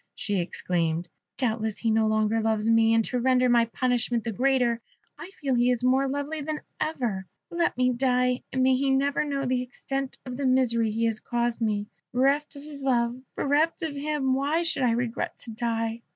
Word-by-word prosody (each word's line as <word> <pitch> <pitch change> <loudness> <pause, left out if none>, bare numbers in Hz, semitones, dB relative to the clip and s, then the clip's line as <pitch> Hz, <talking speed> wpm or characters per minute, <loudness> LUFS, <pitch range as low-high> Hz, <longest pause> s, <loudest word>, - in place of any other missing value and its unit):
she 205 -2 -1
exclaimed. 170 -1 -1 0.3
"Doubtless 220 -4 -1
he 230 - 0
no 220 0 +3
longer 215 +1 +1
loves 220 -1 0
me. 225 0 +4
And 225 -1 +3
to 250 - -1
render 255 0 +3
my 240 -1 +4
punishment 240 -1 0
the 230 - -2
greater, 245 0 +1 0.3
I 345 - -9
feel 285 -8 -3
he 245 0 +3
is 245 -1 0
more 260 +2 +3
lovely 285 +3 -3
than 305 +1 -4 0.2
ever. 235 -12 -2 0.2
Let 340 -6 0
me 255 0 +3
die; 250 0 +1
and 260 -1 +1
may 260 0 +4
he 270 +1 +1
never 275 +2 +2
know 280 -2 -2
the 250 0 +1
extent 270 +2 -5
of 250 -1 -6
the 275 -1 0
misery 235 -3 +2
he 225 +2 0
has 225 -1 0
caused 240 0 -2
me. 210 -2 0 0.3
Bereft 275 +4 +1
of 280 - -10
his 295 -2 -9
love 240 -3 +1 0.2
bereft 300 +5 +1
of 310 -3 -3
him 285 -2 0
why 290 +5 +1
should 330 - +1
I 250 - +3
regret 235 -1 -2
to 230 - -6
die?" 230 0 -2
250 Hz, 195 wpm, -26 LUFS, 225-275 Hz, 0.3 s, me